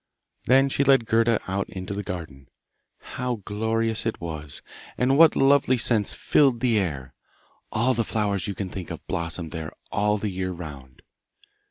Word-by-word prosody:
Then 135 +2 +5
she 135 +1 +1
led 135 -4 +4
Gerda 115 0 +3
out 95 +1 -2
into 95 +1 -6
the 100 - -3
garden. 80 -8 -7 0.5
How 125 -1 -3
glorious 110 +1 -1
it 115 - -2
was, 75 -4 -6 0.3
and 130 +2 +2
what 160 +1 +7
lovely 135 -2 +4
scents 110 -3 +1
filled 135 -5 +3
the 115 -3 +2
air! 70 -9 -3 0.6
All 120 +4 +2
the 115 -1 0
flowers 100 -4 -1
you 100 - -3
can 95 -2 -4
think 90 -2 -7
of - - -7
blossomed 85 -1 -4
there 80 -2 -5 0.2
all 105 +1 +1
the 105 0 -3
year 95 0 -3
round. 70 -7 -10
105 Hz, 165 wpm, -25 LUFS, 90-120 Hz, 0.6 s, what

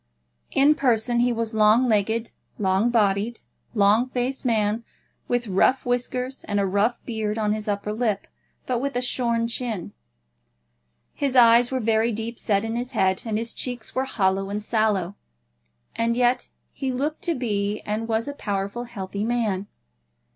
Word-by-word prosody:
In 280 +2 +5
person 240 -4 +1
he 245 +1 +3
was 230 -1 -2
a - - -3
long 215 +4 +5
legged, 220 +1 +1 0.3
long 195 +3 +2
bodied, 215 0 +1 0.3
long 210 +4 +4
faced 255 +1 -2
man, 220 -1 +1 0.4
with 245 0 0
rough 215 +6 +2
whiskers 250 +1 -2
and 205 -1 0
a 200 - +2
rough 205 +5 +1
beard 220 -2 -2
on 210 -1 +1
his 215 0 -5
upper 205 0 -2
lip, 215 -3 -1 0.4
but 250 -2 0
with 280 0 -2
a 245 - +1
shorn 235 -2 +1
chin. 230 -6 -3 1.2
His 275 -2 -1
eyes 235 0 +7
were 260 - -1
very 225 0 +2
deep 225 +2 -4
set 200 -1 +1
in 225 +1 -3
his 245 +1 -4
head, 190 0 +2
and 215 -1 0
his 230 +1 -3
cheeks 245 -3 -5
were 260 +1 0
hollow 195 -5 0
and 205 +1 -3
sallow, 210 -4 0 0.8
and 230 +1 0
yet 245 0 +2 0.2
he 270 -2 -2
looked 285 +5 -2
to 340 -2 +1
be 210 -4 -1
and 215 +2 -3
was 225 +2 0
a 285 - -3
powerful, 200 -1 -3
healthy 200 -3 -5
man. 215 -4 -1
225 Hz, 165 wpm, -24 LUFS, 210-245 Hz, 1.2 s, eyes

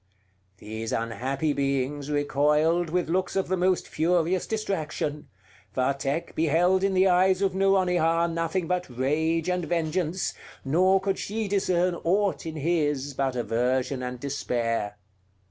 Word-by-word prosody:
These 110 +2 -6
unhappy 130 +6 -1
beings 140 +1 -1
recoiled 150 +4 +2
with 180 +1 0
looks 185 +3 -1
of 195 -2 0
the 185 - +2
most 185 0 +1
furious 175 +2 +1
distraction; 155 -9 -3 0.5
Vathek 140 +4 -1
beheld 175 +4 +2
in 195 -1 +1
the 185 +1 +5
eyes 185 +1 +3
of 195 -2 +1
Nouronihar 180 -4 +2
nothing 165 +2 -1
but 180 -1 -2
rage 155 +6 0
and 180 -1 0
vengeance, 170 +1 -1 0.3
nor 185 +7 +4
could 195 0 -2
she 215 +1 -3
discern 185 -2 +1
aught 190 -2 +1
in 160 - -5
his 150 -3 0
but 135 -1 -1
aversion 125 +2 0
and 125 0 -5
despair. 115 -6 -2
160 Hz, 130 wpm, -26 LUFS, 140-185 Hz, 0.5 s, the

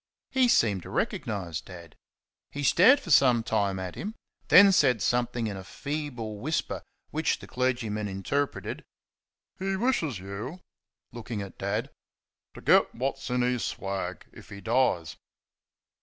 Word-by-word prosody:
He 260 -2 +4
seemed 105 - +3
to - - -10
recognise 90 -7 -2
Dad. 85 -3 -12 0.5
He 145 - -5
stared 200 - +6
for 170 - -7
some 125 -5 +5
time 100 -4 0
at 95 -1 -5
him, 215 +3 -6 0.3
then 200 +1 +8
said 135 - +4
something 120 +2 0
in 105 -2 -3
a 95 - -7
feeble 125 -5 -5
whisper, 155 +8 -2 0.3
which - - 0
the - - -11
clergyman 115 -5 -1
interpreted 120 +9 -3 0.8
"He 195 +1 -1
wishes 190 - 0
you 100 - -7 0.3
" - - -49
looking 115 -3 -5
at 100 - -11
Dad - - -2 0.6
"to - - -10
get - - +4
what's 135 +1 -3
in 125 0 +1
his 125 -3 0
swag 95 -4 -4
if - - -14
he 100 - -9
dies." 110 -8 +1
120 Hz, 145 wpm, -28 LUFS, 100-140 Hz, 0.8 s, then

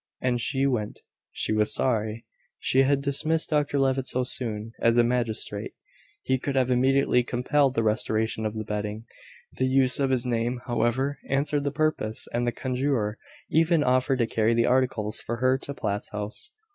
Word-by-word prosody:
As 125 -1 0
she 135 +3 0
went, 120 -6 -2 0.3
she - - -2
was 105 0 +2
sorry 110 -3 -1 0.3
she 130 - +2
had 140 +1 +2
dismissed 155 +4 +1
Dr 150 -1 +1
Levitt 135 -1 +1
so 130 - 0
soon. 115 -3 -1
As 115 +1 +3
a 120 - +6
magistrate, 115 -4 -1 0.5
he 130 0 0
could 140 +2 -3
have 130 -1 +2
immediately 130 0 +3
compelled 130 +3 +1
the 115 - +1
restoration 110 +1 0
of 110 0 -3
the 110 - -3
bedding. 105 +1 -4 0.5
The 130 - +2
use 130 0 +3
of 135 -1 +1
his 130 -2 +1
name, 120 0 -1
however, 130 +4 0
answered 145 +1 0
the 140 - 0
purpose, 145 -7 -1
and 120 +1 0
the - - +2
conjurer 125 -4 -1 0.3
even 160 0 +3
offered 130 +1 +2
to 120 - +2
carry 115 +1 +1
the 115 - +3
articles 125 -4 +1
for 120 - -4
her 130 +2 +2
to 140 - -6
Platt's 105 -4 -3
house. 105 - -6
125 Hz, 175 wpm, -26 LUFS, 110-135 Hz, 0.5 s, a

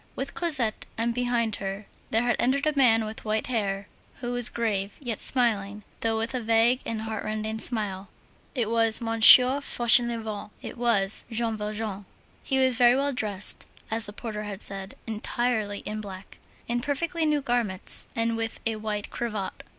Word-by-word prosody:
With 275 +1 -4
Cosette, 270 -11 0
and 230 +1 0
behind 240 -3 0
her, 195 +1 -5 0.2
there 225 +2 +2
had 240 -2 +2
entered 275 +4 +1
a 305 -1 +1
man 225 -5 +4
with 215 +1 -7
white 215 0 -1
hair 200 -5 -2 0.3
who 245 -1 -5
was 245 -1 +4
grave 205 -4 -2
yet 240 -6 -4
smiling, 210 -5 +3 0.2
though 225 -1 0
with 225 +3 -2
a 255 - -2
vague 230 +3 +3
and 220 -1 -3
heartrending 220 0 -4
smile. 205 -5 -2 0.5
It 230 -4 0
was 225 -1 +3
"Monsieur 245 +4 +7
Fauchelevent"; 235 -5 +2
it - - -8
was 225 -5 +2
Jean 230 -1 -1
Valjean. 210 -1 -4 0.4
He 265 - -1
was 260 -2 +2
very 245 0 +6
well 280 +1 0
dressed, 210 -5 -2 0.2
as 225 0 +1
the 205 - -9
porter 215 -1 -6
had 205 -1 -6
said, 195 0 -6
entirely 220 -1 -2
in 215 0 -5
black, 195 -2 -10 0.3
in 240 +1 0
perfectly 325 +5 -2
new 300 -2 +2
garments, 235 -7 -1
and 230 0 0
with 225 0 -3
a 225 -1 0
white 210 -1 -4
cravat. 215 -5 -4
225 Hz, 165 wpm, -26 LUFS, 210-245 Hz, 0.5 s, Monsieur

